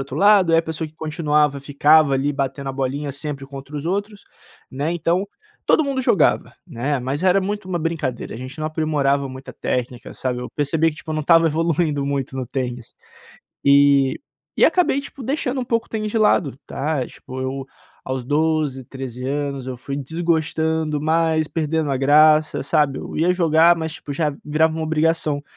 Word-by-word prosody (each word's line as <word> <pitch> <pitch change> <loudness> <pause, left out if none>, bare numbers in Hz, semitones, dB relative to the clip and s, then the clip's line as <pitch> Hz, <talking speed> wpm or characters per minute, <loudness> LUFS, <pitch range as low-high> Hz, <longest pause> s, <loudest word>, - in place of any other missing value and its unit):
outro 135 0 -6
lado, 195 -2 +5
aí 165 - +6
a 165 - +2
pessoa 160 0 -4
que 155 - -23
continuava 150 -3 0
ficava 145 +1 +4
ali 140 +2 0
batendo 140 0 -3
a - - -7
bolinha 135 +2 -3
sempre 140 -1 -6
contra 140 +1 -9
os 145 - -5
outros, 200 +3 -3 0.5
né. 145 +5 -2
Então, 175 +3 0 0.4
todo 315 - +4
mundo 275 -1 -1
jogava, 200 - +2
né, 140 +5 -2
mas 135 +5 -3
era 190 +1 +4
muito 205 0 -4
uma 175 -2 -1
brincadeira 155 -9 -3
a - - -6
gente 130 +4 -8
não 155 - -2
aprimorava 145 -3 0
muita 130 +1 -9
técnica, 125 -1 -4
sabe? 125 -1 -3
Eu 125 - -6
percebi 150 +3 +2
que 150 - -12
tipo 160 - -8
eu - - -1
não 155 - -1
estava 165 +2 +5
evoluindo 160 -2 0
muito 135 -2 -2
no 130 -1 -3
tênis. 125 -2 -5 0.7
Eh, 140 -1 +5 0.4
e - - +5
acabei, 350 -6 +2
tipo, 275 -1 -10
deixando 270 +1 -2
um - - -4
pouco 230 -1 -1
o - - -27
tênis 215 -1 -3
de 225 - 0
lado, 155 -10 +2
tá? 140 -2 -2
Tipo 130 0 -9
eu, 130 +1 -3 0.4
aos 130 -1 -3
12, 150 -2 0
13 130 -1 -7
anos, 140 -1 -3
eu 130 -1 -5
fui 140 +3 -5
desgostando 160 0 -1
mais, 160 0 +1
perdendo 160 -2 -1
a 135 - +1
graça, 150 +3 +4
sabe? 150 -4 +1
Eu - - -7
ia 170 +3 +3
jogar 170 -1 +4
mas 160 -1 -4
tipo 145 - -7
já, 150 0 -1
virava 155 +2 +2
uma 160 - -3
obrigação. 155 -2 0
150 Hz, 190 wpm, -21 LUFS, 135-165 Hz, 0.7 s, aí